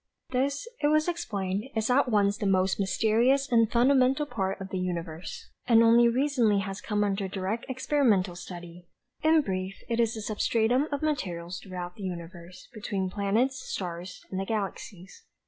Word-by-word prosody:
"This," 275 - -1
it 295 - +3
was 310 +2 +3
explained, 205 - -2
"is 220 +2 +1
at 255 0 +3
once 205 -2 +3
the 205 - -1
most 190 0 +2
mysterious 230 +7 +2
and 230 -2 +4
fundamental 260 +3 +3
part 195 -8 -3
of 195 0 -7
the 190 - -3
universe, 170 -2 -5 0.2
and 230 -2 +6
only 235 +1 +6
recently 245 -4 +2
has 195 0 -5
come 210 -1 0
under 195 -1 -1
direct 195 +5 -3
experimental 245 -9 +1
study. 175 0 -10 0.3
In 315 0 +5
brief, 190 -4 -3
it 230 0 0
is 230 -1 +2
the 220 - -5
substratum 225 +5 +1
of 285 +1 -2
materials 180 - -2
throughout 180 -2 -7
the 205 - -8
universe, 175 0 -8
between 200 -3 -3
planets, 225 +7 0
stars 180 0 -6
and 190 - -2
the 195 - -2
galaxies. 200 - -5
210 Hz, 165 wpm, -28 LUFS, 185-250 Hz, 0.3 s, and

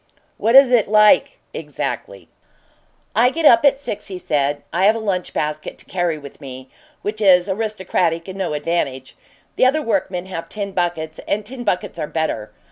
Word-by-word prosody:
"What 230 +4 +2
is 270 -2 +8
it 235 -4 +4
like 215 - +4 0.2
exactly?" - - -5 0.9
"I 245 +2 +5
get 320 +4 -2
up 230 -3 +7
at 280 -2 +4
six," 210 -7 -5
he 190 - -6
said. 145 -4 -1
"I 185 +3 +2
have 215 +2 +5
a - - -3
lunch 195 -5 -2
basket 150 0 -4
to - - -12
carry 175 -3 -1
with 145 0 -12
me, 130 -1 -9 0.3
which 215 +1 -3
is 185 -2 +5
aristocratic 190 -5 -1
and 190 +1 -8
no 180 -5 -2
advantage. 145 -4 -2 0.4
The 255 - +5
other 305 +4 +1
workmen 190 -5 -1
have 165 -3 -7
tin 200 -2 -4
buckets, 170 -4 -2
and 210 +1 -1
tin 245 +2 -8
buckets 180 -5 -2
are 150 - -2
better. 115 -11 -3
185 Hz, 180 wpm, -20 LUFS, 160-215 Hz, 0.9 s, is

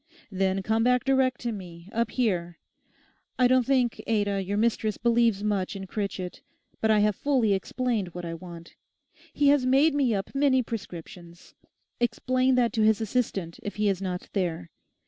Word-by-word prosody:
Then 190 0 0
come 220 +3 +1
back 250 0 +3
direct 265 -2 +2
to 240 - -2
me, 175 -4 -9
up 230 -1 0
here. 175 -9 -1 0.8
I 250 - +5
don't 255 -1 +3
think, 255 -3 +1
Ada, 205 -3 +1
your 200 +2 -2
mistress 220 -1 0
believes 230 -3 +2
much 200 -2 -1
in 195 -1 -6
Critchett; 190 -2 -4 0.4
but 220 - +2
I 215 -1 +4
have 210 -1 +2
fully 255 -6 +1
explained 220 +1 -1
what 175 0 -7
I 165 - -4
want. 170 -1 -10 0.6
He 290 -1 +3
has 285 -2 +4
made 275 +5 +4
me 265 -6 +2
up 195 0 -4
many 275 -2 +3
prescriptions. 175 -5 -9 0.5
Explain 255 +2 +1
that 240 -2 +2
to 225 - 0
his 215 0 +4
assistant 210 -6 -2
if 205 - -6
he 210 -1 +1
is 195 -1 -1
not 180 -2 -4
there. 170 - -2
215 Hz, 170 wpm, -27 LUFS, 190-250 Hz, 0.8 s, I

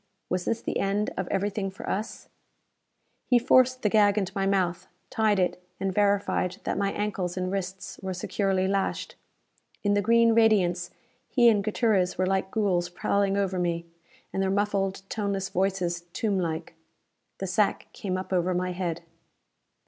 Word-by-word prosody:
Was 180 0 -1
this 230 0 -1
the - - -2
end 200 +2 0
of 190 - -3
everything 200 0 -1
for 190 - -10
us? 210 +3 -4 1.0
He 250 - +5
forced 255 +1 +4
the - - +4
gag 205 -1 +4
into 190 -3 0
my 195 -1 0
mouth, 180 -3 0 0.2
tied 215 -2 +2
it, 180 -1 0 0.2
and 190 -1 -1
verified 200 -2 +1
that - - -1
my 200 0 +1
ankles 190 -4 -2
and 185 0 -1
wrists 190 -1 -5
were 190 -1 -4
securely 190 +1 0
lashed. 195 0 -1 0.7
In 205 -1 +2
the 205 - +3
green 230 +2 +4
radiance 185 -6 +3 0.4
he 240 -3 +5
and 205 -3 +2
Gutierrez 210 -4 +1
were 185 - +2
like 190 0 0
ghouls 190 -5 0
prowling 200 +2 0
over 190 -2 0
me, 170 -1 -1 0.5
and 190 - 0
their 190 - +1
muffled 195 -1 0
toneless 200 -3 -2
voices, 180 -2 -1
tomblike. 175 -7 -1 0.6
The 195 - -4
sack 195 +3 +1
came 185 -2 -3
up 190 +1 -5
over 180 0 +1
my 180 0 -1
head. 175 -2 -3
195 Hz, 160 wpm, -27 LUFS, 185-205 Hz, 1.0 s, He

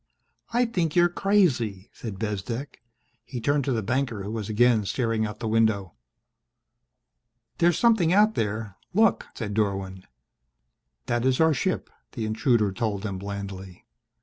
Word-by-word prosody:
"I 240 +1 +3
think 175 -9 -1
you're 175 0 +5
crazy!" 135 - +1
said 110 -5 -7
Bezdek. 115 +7 -4 0.4
He 125 +1 -6
turned 145 +4 +1
to 135 - 0
the 115 -3 0
banker, 120 -2 -1
who 100 - -5
was 110 -2 -4
again 115 0 +3
staring 115 0 0
out 105 0 -7
the 110 - -3
window. 110 -5 +1 1.7
"There's 170 -1 +4
something 220 -9 +4
out 210 +3 +5
there 105 - -3 0.2
look," 225 +2 +3
said 105 -3 -4
Dorwin. 95 -3 -2 1.0
"That 120 0 0
is 130 0 +2
our 160 -1 +5
ship," 185 +7 -2 0.2
the 115 -4 -3
intruder 110 -1 +2
told 100 0 -2
them 100 -3 -4
blandly. 100 -2 -7
115 Hz, 145 wpm, -26 LUFS, 100-145 Hz, 1.7 s, you're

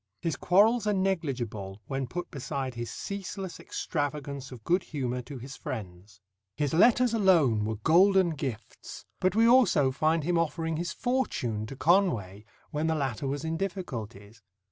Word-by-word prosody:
His 165 -4 -2
quarrels 215 +8 +3
are 210 - +2
negligible 125 - -2
when 135 -1 -3
put 175 +7 -5
beside 135 -2 -4
his 120 -1 -5
ceaseless 195 - -6
extravagance 140 -3 -4
of 120 -4 -10
good 180 - +2
humour 125 -6 -3
to 135 +3 -9
his 130 +2 -8
friends. 95 -3 -8 0.4
His 145 -1 0
letters 240 +7 +5
alone 165 - +4
were 110 +1 -2
golden 180 - +4
gifts, 135 -7 -7
but 185 +1 +1
we 225 +1 +5
also 230 - +5
find 155 +4 +1
him 170 +2 +1
offering 165 0 -1
his 170 +1 -2
fortune 125 - -1
to 135 - -8
Conway 125 - +1 0.3
when 150 +2 -1
the 160 - +1
latter 135 -3 -2
was 140 +3 -3
in 160 0 -2
difficulties. 115 - -6
150 Hz, 155 wpm, -28 LUFS, 120-185 Hz, 0.4 s, letters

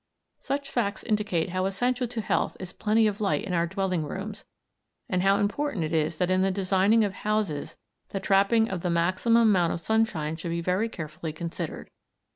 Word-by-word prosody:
Such 280 0 -3
facts 205 -5 -1
indicate 210 -6 0
how 185 +1 -1
essential 245 +5 0
to 230 -1 -4
health - - 0
is 185 -1 -7
plenty 220 +1 +2
of 210 0 -1
light 200 - +1
in 185 - -4
our 170 0 +2
dwelling 185 -2 -1
rooms, 200 +7 -6 0.6
and 180 -1 0
how 195 +1 +4
important 210 - -1
it 155 +1 -3
is 160 0 0
that 180 +2 +1
in 185 0 +3
the 190 - +3
designing 195 +3 +3
of 200 -2 -1
houses 210 -8 -2 0.3
the 195 - -3
trapping 200 +4 +3
of 190 -4 -4
the 180 - -1
maximum 185 +8 +3
amount 185 -6 +3
of - - -3
sunshine 170 -7 0
should 170 - -5
be 170 0 -1
very 185 +6 0
carefully 160 -2 -6
considered. 165 +2 -6
195 Hz, 190 wpm, -27 LUFS, 170-215 Hz, 0.6 s, how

